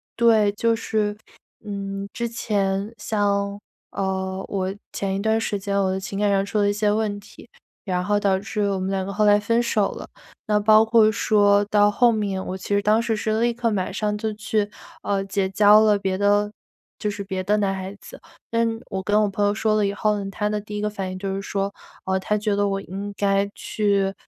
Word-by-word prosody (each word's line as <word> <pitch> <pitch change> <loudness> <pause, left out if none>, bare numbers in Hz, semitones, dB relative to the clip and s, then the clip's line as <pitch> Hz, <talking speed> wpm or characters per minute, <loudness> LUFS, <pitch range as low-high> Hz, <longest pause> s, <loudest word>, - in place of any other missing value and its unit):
对， 225 -3 +4
就 230 +2 +1
是， 210 -2 -1 0.5
嗯， 200 -1 -5
之 235 -1 -3
前 200 -2 -1
像， 200 -1 -1 0.3
呃， 190 0 -2
我 190 -1 -2 0.2
前 195 -1 -2
一 - - -2
段 220 +1 +2
时 205 -2 -2
间 200 0 -2
我 190 - +1
的 190 - -2
情 195 +1 -6
感 205 -1 +2
上 195 0 +2
出 200 +2 -3
了 205 0 +3
一 - - +1
些 205 0 +1
问 210 -1 -1
题， 205 - -16 0.4
然 180 -1 -1
后 205 +1 +1
导 195 -2 +2
致 210 +1 -4
我 195 -1 -1
们 185 +1 -2
两 190 -1 -1
个 200 - -5
后 210 +1 +2
来 205 0 +6
分 230 +3 +1
手 215 -3 +1
了， - - -8 0.4
那 210 -1 +3
包 215 +1 +6
括 225 -1 +5
说 205 -1 +3
到 205 0 +4
后 240 +3 +4
面， 200 -4 -2
我 185 - -4
其 190 - -10
实 205 0 +2
当 215 +2 +3
时 230 -1 0
是 215 +1 -1
立 240 0 +2
刻 235 0 -1
马 190 -3 -1
上 210 +1 -1
就 215 0 -3
去， 210 -1 -1 0.3
呃， 200 -1 0
结 195 -1 -1
交 210 +2 +6
了 210 -1 +4
别 190 -1 -1
的 205 +1 +2 0.5
就 210 - -1
是 205 0 -5
别 190 -1 -3
的 205 +3 +2
男 200 -2 +1
孩 190 +1 -6
子。 - - -12 0.3
但 230 0 +2 0.2
我 190 -2 -3
跟 210 +2 +2
我 210 - +1
朋 205 +1 0
友 205 - +2
说 215 0 +1
了 210 -1 +2
以 200 - -1
后， 210 0 0
她 210 +2 -1
的 210 0 -1
第 210 0 -7
一 205 - -3
个 210 - 0
反 195 -3 -5
应 185 - -6
就 195 0 -3
是 195 - -3
说， 195 0 -2 0.3
呃， 190 0 0
她 210 +2 0
觉 210 -1 0
得 205 0 +1
我 195 0 -2
应 200 +2 -6
该 200 0 +1
去， 200 -2 0
205 Hz, 240 characters per minute, -23 LUFS, 195-210 Hz, 0.5 s, 来